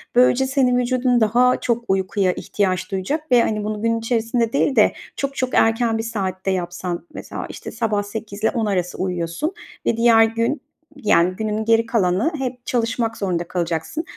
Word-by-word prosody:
böylece 250 +1 +4
senin 260 -2 +2
vücudun 250 +1 0 0.2
daha 245 +4 +4
çok 235 -1 -1
uykuya 190 0 +1
ihtiyaç 185 -1 -2
duyacak 275 +11 -3
ve, 245 -1 +6
hani, 215 -2 -1
bunu 210 0 -3
gün 230 0 +1
içerisinde 230 0 0
değil 280 0 +2
de, 215 - +5 0.2
çok 275 0 -3
çok 255 -1 -2
erken 225 0 +3
bir 225 - -2
saatte 195 -4 -2
yapsan, 175 -1 -3
mesela, - - -6
işte, - - -8
sabah 220 -3 -1
08.00'le 215 0 -3
10.00 230 -3 -1
arası 180 -4 -1
uyuyorsun 180 - -2 0.3
ve 230 - +1
diğer 230 -1 +6
gün, 230 +5 0 0.3
yani, 185 -9 +2
günün 215 +1 -2
geri 230 0 +3
kalanı 215 - +1
hep 250 -2 -5
çalışmak 230 -1 -1
zorunda 175 -4 -2
kalacaksın. 170 - -2
225 Hz, 165 wpm, -21 LUFS, 190-245 Hz, 0.3 s, ve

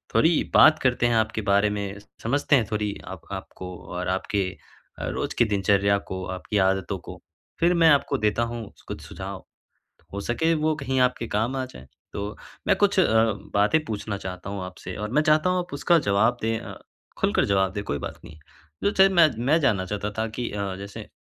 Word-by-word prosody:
थोड़ी 165 0 +4
बात 155 0 +7
करते 125 -2 +1
हैं 120 - +1
आपके 110 0 +1
बारे 100 +1 +4
में, 100 -1 -4 0.2
समझते 140 +4 +2
हैं 120 -5 +3
थोड़ी 105 -1 -1 0.2
आप - - -18
आपको 90 -1 -7 0.2
और 90 +1 -3
आपके 95 +1 -1 0.5
अ, - - -3
रोज़ - - -3
के 120 - +5
दिनचर्या 100 0 +3
को, 95 -1 -6
आपकी 95 +2 -3
आदतों 95 0 -2
को। - - -9 0.4
फिर 175 +1 +4
मैं 165 -1 +5
आपको 145 -1 +3
देता 105 +2 +2
हूँ 115 -2 -5
स - - -19
कुछ - - -5
सुझाव, 95 0 -7 0.7
हो 100 - -4
सके 160 +10 +1
वो 155 0 +1
कहीं 135 -2 -2
आपके 125 -2 +1
काम 115 +6 0
आ 130 - -1
जाएँ। 70 - -13 0.3
तो 100 +1 -5 0.3
मैं 200 - +5
कुछ 200 -1 +2
अ, 180 - +5 0.5
बातें 130 +11 +3
पूछना 105 -4 -4
चाहता 95 +1 -6
हूँ 100 -2 -4
आपसे, 90 0 -8
और 105 +1 -4
मैं 150 - +4
चाहता 155 +3 +3
हूँ 180 - +1
आप 180 0 -5
उसका 170 +4 +3
जवाब 110 +1 +2
दें 115 0 0
अ, - - -8 0.4
खुलकर - - +2
जवाब 95 -1 +2
दें, 100 0 -3
कोई 70 - -2
बात - - -6
नहीं। 75 - -12 0.4
जो 200 - +3
चीज़ 195 -1 +5
मैं 170 -3 +6 0.2
मैं 155 +4 +5
जानना 100 -10 +2
चाहता 105 +2 -3
था 110 - +1
कि 120 - -1
अ, 100 -2 -3
जैसे 100 +1 -8
अ, - - -14
105 Hz, 205 wpm, -25 LUFS, 100-145 Hz, 0.7 s, बात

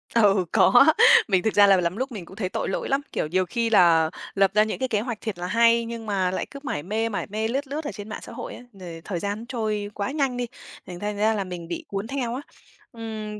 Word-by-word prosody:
Ừ, 200 -5 +4
có. - - +6 0.4
Mình 190 -3 +2
thực 220 - 0
ra 205 -1 +6
là 195 -1 +6
lắm 170 +4 -2
lúc 260 +1 -3
mình 195 -7 -7
cũng 190 - -13
thấy 185 -4 -3
tội - - -3
lỗi - - -3
lắm, 275 +1 +1
kiểu, - - -2
nhiều 185 +3 +1
khi 230 +5 -1
là 165 -6 +5 0.3
lập 195 -1 +3
ra 215 0 +5
những 220 - -4
cái 260 - 0
kế 210 - +1
hoạch 230 -1 -5
thiệt 215 -6 -4
là 180 - -3
hay 230 +1 +3
nhưng 230 -1 -6
mà 190 -3 0
lại - - -2
cứ 280 - -8
mải 145 - -3
mê, 220 +4 -1
mải 205 - -3
mê 220 +2 -2
lướt 270 +4 -2
lướt 295 +3 -4
ở - - -3
trên 205 0 -9
mạng - - -5
xã - - -10
hội - - -7
ấy, 245 - -11
rồi 175 -4 -9
thời 175 -4 -3
gian 205 +4 -4
trôi 215 -4 -3
quá 200 +4 -3
nhanh 275 -4 -1
đi, 245 - -1 0.4
thì 180 - -7
thành 205 0 -3
ra 215 +2 +2
là 205 -2 -1
mình 175 -2 -7
bị 170 - -5
cuốn 200 +2 -4
theo 250 -3 -3
á. 270 - -4 0.5
Ừm, 215 -2 -6
210 Hz, 270 wpm, -24 LUFS, 190-230 Hz, 0.5 s, có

